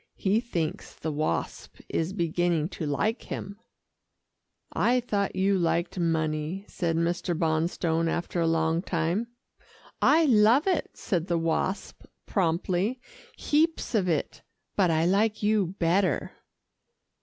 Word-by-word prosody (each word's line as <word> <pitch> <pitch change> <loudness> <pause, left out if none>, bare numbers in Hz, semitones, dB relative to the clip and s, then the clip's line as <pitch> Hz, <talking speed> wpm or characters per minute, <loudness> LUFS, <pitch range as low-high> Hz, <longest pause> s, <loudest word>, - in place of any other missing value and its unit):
He 205 +3 +1
thinks 175 -10 -4
the 160 - -4
Wasp 150 - -3
is 165 +2 -1
beginning 170 -3 0
to 160 -5 -5
like 210 - 0
him." 200 +2 -6 1.1
"I 250 +1 +3
thought 205 -5 -1
you 195 0 +2
liked 170 +2 0
money," 160 +2 -1
said 170 -2 -2
Mr. 170 +1 -1
Bonstone 165 +1 0
after 175 0 -2
a 165 - +2
long 165 0 +1
time. 175 +5 -1 0.7
"I 320 +2 +5
love 235 +2 +5
it," 370 -4 0
said 180 -5 -2
the 170 - +1
Wasp 165 +4 -2 0.2
promptly, 185 +5 0 0.4
"heaps 315 0 +1
of 195 -5 +2
it, 160 - -2 0.3
but 190 -3 +3
I 160 0 +2
like 210 +4 +1
you 205 -4 +1
better." 175 -1 +1
175 Hz, 125 wpm, -27 LUFS, 165-205 Hz, 1.1 s, I